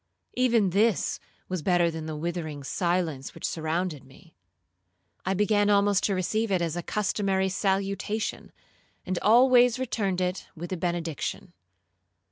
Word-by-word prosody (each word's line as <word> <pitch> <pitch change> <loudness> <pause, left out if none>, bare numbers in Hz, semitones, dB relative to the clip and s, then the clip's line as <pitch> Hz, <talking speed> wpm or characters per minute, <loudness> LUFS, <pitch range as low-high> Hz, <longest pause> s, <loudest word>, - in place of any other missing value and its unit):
Even 235 -6 +2
this 210 +3 +1 0.3
was 185 -3 -3
better 175 0 +2
than 160 -1 -6
the 155 - -4
withering 155 -2 -4
silence 170 -4 -1
which - - -5
surrounded 160 -1 -2
me. 145 +5 -19 0.9
I 190 - +1
began 205 +1 +2
almost 200 -1 +3
to 200 - +1
receive 215 +4 -1
it 185 - +2
as 170 -2 -2
a 175 - -2
customary 195 0 0
salutation, 195 +2 -2 0.5
and 185 -1 -2
always 245 +2 +5
returned 210 -7 -1
it 180 0 -2
with 175 +2 -6
a - - -2
benediction. 170 - -3
185 Hz, 135 wpm, -27 LUFS, 170-205 Hz, 0.9 s, always